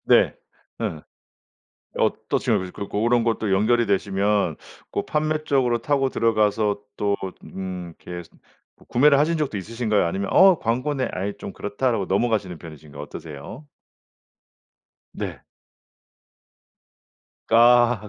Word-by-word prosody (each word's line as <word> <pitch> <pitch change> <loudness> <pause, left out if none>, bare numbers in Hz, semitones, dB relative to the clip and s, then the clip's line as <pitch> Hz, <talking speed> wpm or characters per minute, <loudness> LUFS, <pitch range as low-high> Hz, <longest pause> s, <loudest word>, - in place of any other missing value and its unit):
네. - - +4 0.5
음. 80 - -3 1.0
어떤 - - 0
식으로 95 -1 0
그 100 - -6
고런 115 +3 +2
것들이 110 -3 0
연결이 115 +4 +3
되시면 100 -3 +1 0.3
고 - - -3
판매 155 0 -1
쪽으로 130 -5 +2
타고 135 +2 +1
들어가서 110 -3 +1 0.2
또 100 -1 0 0.3
음 90 -3 -6
이렇게 85 -1 -7 0.5
구 - - -21
구매를 140 +3 +4
하신 160 +3 +2
적도 145 -8 -1
있으신가요? 110 +1 0
아니면 95 +3 -2
'어 190 -3 +7
광고네. 130 +4 -1
아이 100 +2 -3
좀 - - -7
그렇다.'라고 105 +1 -1
넘어가시는 100 -4 0
편이신가요? 75 -3 -11
어떠세요? 75 - -9 1.5
네. - - -5 2.1
아 120 -1 +5
110 Hz, 265 characters per minute, -23 LUFS, 95-125 Hz, 2.1 s, 어